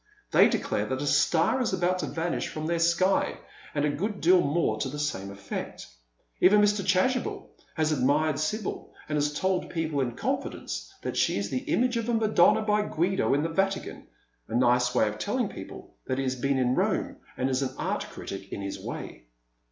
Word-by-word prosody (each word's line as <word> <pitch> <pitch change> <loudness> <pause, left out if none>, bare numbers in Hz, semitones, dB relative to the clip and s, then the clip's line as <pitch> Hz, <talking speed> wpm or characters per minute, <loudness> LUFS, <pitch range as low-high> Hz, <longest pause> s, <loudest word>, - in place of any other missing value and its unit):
Tliey - - +7
declare - - -1
that - - -2
a - - -2
star 260 - +3
is 230 - 0
about 185 0 +1
to - - -2
vanish 165 +1 -2
from 155 0 -5
their 170 +1 0
sky, 170 +3 +2 0.4
and 145 0 +1
a - - +2
good 200 +7 -3
deal 180 +2 +5
more 145 -8 0
to 130 - -1
the 145 - -6
same 100 -10 -2
effect. 100 0 -6 0.5
Even 205 +3 +6
Mr. 205 -1 +3
Chasubel 190 +8 0 0.2
has 155 -1 +1
admired 145 +2 +2
Sibyl, 185 +7 -3
and 150 - -2
has 145 0 +1
told 185 +4 -1
people 160 -4 -1
in 120 -3 -2
confidence - - -3
that - - -3
she - - +2
is 100 0 -3
the 130 - -2
image 245 0 +2
of 230 0 -2
a 235 - +2
Madonna 220 0 +4
by 210 0 +2
Guido 190 -4 +1
in 145 - +1
the 165 - -1
Vatican, 195 +3 -2 0.4
a - - -4
nice 125 0 +3
way 110 - +4
of 105 0 -4
telling 105 - 0
people - - -10
that 130 - -1
he 135 - 0
has 130 -1 -1
been 135 +2 0
in 125 -1 +2
Rome, - - 0 0.2
and 130 - 0
is 130 0 0
an 130 -1 -3
art - - -2
critic 95 0 -8
in - - -4
his 100 - -5
way. - - -7
155 Hz, 200 wpm, -27 LUFS, 130-190 Hz, 0.5 s, Tliey